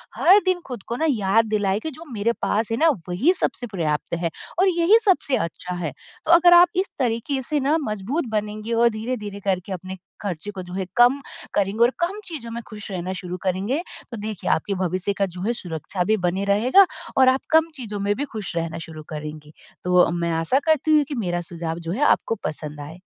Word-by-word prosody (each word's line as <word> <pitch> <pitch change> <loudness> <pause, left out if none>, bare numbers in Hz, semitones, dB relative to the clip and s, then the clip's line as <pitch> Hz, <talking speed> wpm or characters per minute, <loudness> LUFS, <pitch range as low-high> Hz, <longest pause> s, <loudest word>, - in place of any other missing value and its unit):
हर 385 +4 +6
दिन 370 -1 +2
खुद 245 -6 -6
को 235 - -2
ना 320 - 0
याद 225 -2 +3
दिलाए 205 -2 0
कि 315 - -5
जो 315 +4 -11
मेरे 225 +2 +1
पास 220 +2 0
है 225 - 0
ना 325 +5 +5 0.2
वही 260 - +3
सबसे 245 - -1
पर्याप्त 165 -9 -2
है 170 0 -1 0.3
और 385 - +5
यही 350 +6 +5
सबसे 355 -9 +3
अच्छा 180 +2 -4
है। 170 -4 -3 0.3
तो 320 - +2
अगर 350 +1 +7
आप 350 +1 +8
इस 375 +2 0
तरीक़े 245 +2 0
से 300 -1 +1
ना 285 +4 +2
मज़बूत 215 - -2
बनेंगे 215 +1 -3
और 235 +1 +4
धीरे-धीरे 215 -2 -4
करके 190 0 -1
अपने 185 +1 -6 0.2
खर्चे 200 0 -4
को 190 -2 -7
जो 180 0 -10
है 190 -1 -2
कम 250 +4 +5 0.3
करेंगे 205 +3 +2
और 240 - +5
कम 370 +5 -1
चीज़ों 295 -10 -6
में 235 +1 -4
खुश 210 -1 -8
रहना 185 0 -3
शुरू 180 -1 -5
करेंगे 195 - 0 0.3
तो 235 - -5
देखिए 210 -1 -4
आपके 200 +5 0
भविष्य 185 +2 -1
का 195 - +3
जो 180 -1 -8
है 225 +5 0
सुरक्षा 175 -2 -3
भी 215 +4 +2
बनी 190 +3 0
रहेगा 245 - +5 0.3
और 260 -1 +7
आप 260 +1 +2
कम 320 +1 +5
चीज़ों 215 -7 -5
में 200 +1 +1
भी 285 - -2
खुश 210 -5 -5
रहना 165 -1 -2
शुरू 155 -1 -9
करेंगी। 150 0 -7 0.3
तो 180 -1 +5
मैं 170 -1 -1
आशा 165 +12 +2
करती 310 -1 +3
हूँ 295 - +4
कि 285 - -3
मेरा 175 -7 -1
सुझाव 170 -1 -5
जो 165 0 -5
है 245 +11 0
आपको 225 - +3
पसंद 150 -1 -5
आए। 160 +5 -9
210 Hz, 215 wpm, -23 LUFS, 180-265 Hz, 0.3 s, आप